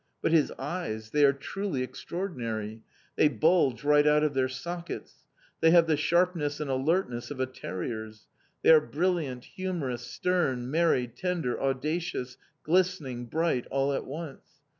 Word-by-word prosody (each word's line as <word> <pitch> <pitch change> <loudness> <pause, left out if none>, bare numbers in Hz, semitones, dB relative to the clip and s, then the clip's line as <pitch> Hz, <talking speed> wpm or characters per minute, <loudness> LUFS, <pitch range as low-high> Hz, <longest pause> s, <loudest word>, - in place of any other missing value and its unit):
But - - +2
his 160 -3 +4
eyes! 135 -8 -4
They 150 0 +3
are 140 - +6
truly 140 +1 -3
extraordinary! 115 - -5 0.4
They - - +6
bulge 150 -1 +2
right 150 0 +5
out 150 0 +4
of 150 -1 +1
their 130 -1 +1
sockets. 170 +7 -7 0.3
They 160 - +5
have 170 0 +6
the 160 -1 +2
sharpness 165 -2 +1
and 150 -3 -2
alertness 130 -3 0
of 145 - -7
a 130 - +2
terrier's. 110 -2 -6 0.4
They - - +7
are 155 -1 +8
brilliant, 155 -6 -1
humorous, 170 -11 -3
stern, 130 -6 -1
merry, 160 -5 +3
tender, 170 -1 -2
audacious, 135 -1 -2 0.3
glistening, 160 -8 0
bright, 160 -3 0
all 135 +1 0
at - - -2
once. 150 +1 -8
145 Hz, 145 wpm, -28 LUFS, 125-170 Hz, 0.4 s, are